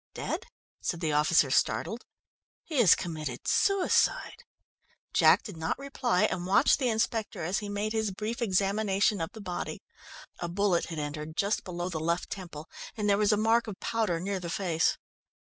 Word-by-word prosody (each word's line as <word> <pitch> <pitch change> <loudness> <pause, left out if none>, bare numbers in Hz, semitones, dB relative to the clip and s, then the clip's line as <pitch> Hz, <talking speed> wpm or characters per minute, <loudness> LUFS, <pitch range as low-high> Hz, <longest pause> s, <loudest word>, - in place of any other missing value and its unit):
"Dead?" - - -4 0.3
said 170 - -2
the 160 -3 -1
officer, 150 -1 +3
startled. 225 - 0 0.6
"He 305 -5 -2
has 215 -8 +7
committed 155 -8 -5
suicide!" 395 +5 +2 0.7
Jack - - +5
did 205 - -8
not 160 0 -2
reply, 260 -8 0
and 180 -4 0
watched 200 +8 +4
the 255 -3 +1
inspector 220 -4 -1
as 180 +4 0
he 205 - -6
made 205 +2 -2
his 220 -1 0
brief, 215 +4 -4
quick 235 - -1
examination 195 0 +1
of 165 - -3
the 220 - -9
body. 180 -3 -5 0.6
A 175 - -3
bullet 185 -1 +1
had 165 - -7
entered 150 +1 -5
just 200 +2 0
below 175 -2 -4
the 170 -4 -3
left 170 +2 -1
temple, 170 -6 -7 0.3
and 210 -1 -1
there 200 0 +3
was 210 0 +3
a 210 - +3
mark 225 +2 +2
of 205 -3 -7
powder 215 -7 0
near 195 +2 -2
the 175 -1 -6
face. 165 -3 +1
195 Hz, 175 wpm, -29 LUFS, 170-220 Hz, 0.7 s, has